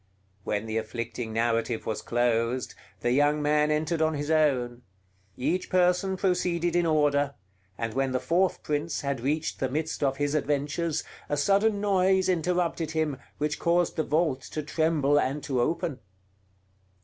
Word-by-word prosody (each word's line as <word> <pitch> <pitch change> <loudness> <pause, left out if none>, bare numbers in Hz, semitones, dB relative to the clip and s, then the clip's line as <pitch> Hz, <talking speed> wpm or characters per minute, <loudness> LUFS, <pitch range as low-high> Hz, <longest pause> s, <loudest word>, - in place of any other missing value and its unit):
When 105 +2 -2
the 110 0 -2
afflicting 115 +1 -4
narrative 115 0 0
was 110 - -2
closed, 120 +1 0 0.3
the 120 - +1
young 145 +3 +3
man 150 0 +2
entered 155 +2 0
on 160 0 +2
his 145 +2 -2
own. 130 -6 +2 0.6
Each 155 +8 -1
person 185 +1 +2
proceeded 175 -2 0
in 175 -1 +3
order, 145 -2 +2 0.4
and 115 -1 -3
when 135 +1 0
the 130 - 0
fourth 180 +5 +1
prince 150 +2 -2
had 140 -4 -2
reached 150 +5 -1
the 130 - 0
midst 155 +4 -3
of 135 -1 +1
his 145 0 0
adventures, 150 +2 -1 0.3
a 145 - 0
sudden 200 +6 +2
noise 190 -2 +3
interrupted 175 -2 0
him, 155 -4 -1 0.2
which 150 +1 -2
caused 170 0 +2
the 155 - 0
vault 150 -3 +1 0.2
to 155 - -1
tremble 150 -2 +2
and 140 +1 -1
to 130 -3 0
open. 150 0 -1
150 Hz, 155 wpm, -27 LUFS, 130-170 Hz, 0.6 s, young